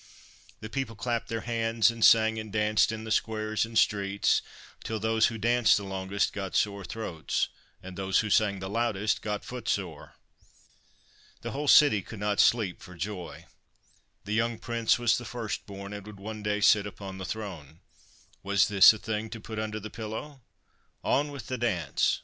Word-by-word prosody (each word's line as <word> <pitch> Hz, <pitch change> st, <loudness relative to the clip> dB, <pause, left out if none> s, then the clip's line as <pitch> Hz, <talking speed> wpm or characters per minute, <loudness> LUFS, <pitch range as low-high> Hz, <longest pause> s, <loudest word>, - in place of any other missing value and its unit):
The 110 Hz, -, -7 dB
people 130 Hz, -3 st, -3 dB
clapped 115 Hz, +2 st, -2 dB
their 115 Hz, -1 st, -3 dB
hands 115 Hz, -1 st, +1 dB
and 115 Hz, -1 st, -4 dB
sang 110 Hz, 0 st, +6 dB
and 110 Hz, -1 st, -7 dB
danced 105 Hz, 0 st, +2 dB
in 110 Hz, 0 st, -5 dB
the 110 Hz, -, -6 dB
squares 110 Hz, 0 st, 0 dB
and 115 Hz, 0 st, -5 dB
streets, 100 Hz, -2 st, +2 dB, 0.4 s
till 110 Hz, -1 st, -3 dB
those 110 Hz, +1 st, +3 dB
who 115 Hz, -, -5 dB
danced 120 Hz, +1 st, +3 dB
the 100 Hz, -, -4 dB
longest 95 Hz, +1 st, -2 dB
got 95 Hz, -2 st, -5 dB
sore 100 Hz, -1 st, 0 dB
throats, 90 Hz, -7 st, -3 dB, 0.3 s
and 95 Hz, 0 st, -9 dB
those 95 Hz, 0 st, +1 dB
who 105 Hz, -2 st, -4 dB
sang 100 Hz, -2 st, +3 dB
the 95 Hz, 0 st, -6 dB
loudest 110 Hz, -1 st, 0 dB
got 105 Hz, -1 st, -4 dB
footsore. 100 Hz, -10 st, -4 dB, 1.3 s
The -, -, -5 dB
whole 145 Hz, +1 st, -4 dB
city 140 Hz, -8 st, +6 dB
could 110 Hz, -, -10 dB
not 105 Hz, 0 st, -1 dB
sleep 110 Hz, -7 st, +3 dB
for 90 Hz, -, -12 dB
joy. 85 Hz, -4 st, -6 dB, 0.8 s
The 105 Hz, -, -3 dB
young 115 Hz, +1 st, 0 dB
Prince 115 Hz, +1 st, +1 dB
was 120 Hz, -1 st, +2 dB
the -, -, -8 dB
first 115 Hz, -3 st, -5 dB
born, 100 Hz, 0 st, -8 dB
and 100 Hz, -1 st, -7 dB
would 105 Hz, -2 st, -11 dB
one 110 Hz, +2 st, -7 dB
day 105 Hz, 0 st, -1 dB
sit 105 Hz, -1 st, +5 dB
upon 95 Hz, -1 st, -8 dB
the -, -, -5 dB
throne: 90 Hz, -8 st, -7 dB, 0.6 s
was 100 Hz, 0 st, +2 dB
this 100 Hz, +1 st, +8 dB
a -, -, -6 dB
thing 110 Hz, 0 st, -4 dB
to 115 Hz, -, -7 dB
put 110 Hz, +1 st, -6 dB
under 110 Hz, 0 st, -3 dB
the 110 Hz, +1 st, -8 dB
pillow? 115 Hz, +6 st, -7 dB, 0.6 s
On 145 Hz, +1 st, +1 dB
with 140 Hz, -5 st, -8 dB
the 130 Hz, -2 st, -4 dB
dance! 90 Hz, -, 0 dB
110 Hz, 180 wpm, -28 LUFS, 100-115 Hz, 1.3 s, this